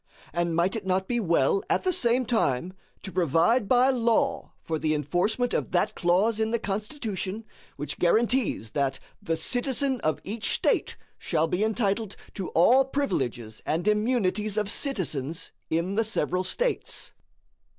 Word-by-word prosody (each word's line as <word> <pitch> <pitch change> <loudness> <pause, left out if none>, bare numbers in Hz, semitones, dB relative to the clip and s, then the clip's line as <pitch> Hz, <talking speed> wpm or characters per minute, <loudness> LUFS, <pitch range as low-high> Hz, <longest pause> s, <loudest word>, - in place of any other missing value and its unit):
And 170 -1 0
might 175 +5 +1
it 220 - -3
not 190 0 +1
be 240 -1 0
well 170 -2 +2
at - - +1
the 370 -1 +2
same 245 -2 +2
time 185 - 0 0.3
to 195 - -6
provide 185 - +2
by 250 +4 +5
law 250 +2 +1
for 160 -1 -2
the 155 0 +1
enforcement 180 - 0
of - - -1
that 175 - +2
clause 195 +6 +2
in 220 0 +1
the 235 - +1
Constitution 210 -1 -4 0.3
which 145 0 -5
guarantees 220 - +1
that 135 -2 -1 0.2
"the 165 - -1
citizen 255 - 0
of 155 - 0
each 215 +2 -2
State - - 0 0.2
shall 160 +1 0
be 180 +5 0
entitled 215 -1 0 0.2
to 190 - -4
all 245 +11 +6
privileges 130 - -2
and 165 +6 -1
immunities 210 -2 +1
of 210 -1 0
citizens 165 - -2 0.2
in 170 +4 0
the 225 +3 +2
several 185 -4 0
States?" - - -2
200 Hz, 150 wpm, -27 LUFS, 170-235 Hz, 0.3 s, all